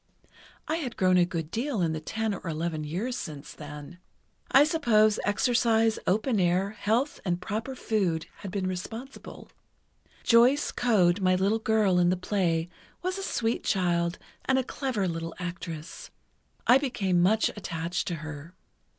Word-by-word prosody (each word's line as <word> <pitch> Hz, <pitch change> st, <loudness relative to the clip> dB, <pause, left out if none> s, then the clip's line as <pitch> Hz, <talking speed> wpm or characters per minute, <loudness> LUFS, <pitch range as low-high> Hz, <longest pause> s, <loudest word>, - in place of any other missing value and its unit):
I 315 Hz, +2 st, 0 dB
had 260 Hz, -8 st, -5 dB
grown 185 Hz, -1 st, +4 dB
a 175 Hz, -, +5 dB
good 165 Hz, -3 st, -4 dB
deal 245 Hz, 0 st, -2 dB
in 160 Hz, -1 st, +1 dB
the 155 Hz, -, -3 dB
ten 220 Hz, +6 st, -2 dB
or 190 Hz, -1 st, -7 dB
eleven 160 Hz, 0 st, -2 dB
years 190 Hz, +12 st, -3 dB
since 150 Hz, -, -7 dB
then. 150 Hz, +3 st, -10 dB, 0.5 s
I 275 Hz, -, +7 dB
suppose 230 Hz, -9 st, +3 dB
exercise, 225 Hz, +1 st, +2 dB
open 215 Hz, +3 st, +1 dB
air, 185 Hz, +2 st, +2 dB
health 225 Hz, +6 st, 0 dB
and 175 Hz, -2 st, -1 dB
proper 220 Hz, +8 st, -4 dB
food, 190 Hz, -10 st, 0 dB
had 200 Hz, -, -7 dB
been 190 Hz, 0 st, -2 dB
responsible. 225 Hz, +8 st, -7 dB, 0.7 s
Joyce 245 Hz, +5 st, +4 dB
Coad, 200 Hz, -7 st, +3 dB
my 185 Hz, -1 st, +3 dB
little 200 Hz, +4 st, +1 dB
girl 215 Hz, -5 st, +2 dB
in 175 Hz, 0 st, +4 dB
the 180 Hz, -, +1 dB
play, 175 Hz, -3 st, 0 dB, 0.4 s
was 370 Hz, +2 st, -2 dB
a -, -, -4 dB
sweet 235 Hz, -, -1 dB
child, 175 Hz, -2 st, +1 dB, 0.3 s
and 265 Hz, -, +2 dB
a 260 Hz, -, +2 dB
clever 250 Hz, -7 st, -2 dB
little 165 Hz, -1 st, -4 dB
actress. 170 Hz, -2 st, -7 dB, 0.6 s
I 255 Hz, -, +6 dB
became 195 Hz, -10 st, 0 dB
much 215 Hz, +5 st, +3 dB
attached 170 Hz, -2 st, -4 dB
to 175 Hz, -, -1 dB
her. 155 Hz, +3 st, -8 dB
195 Hz, 155 wpm, -28 LUFS, 175-230 Hz, 0.7 s, I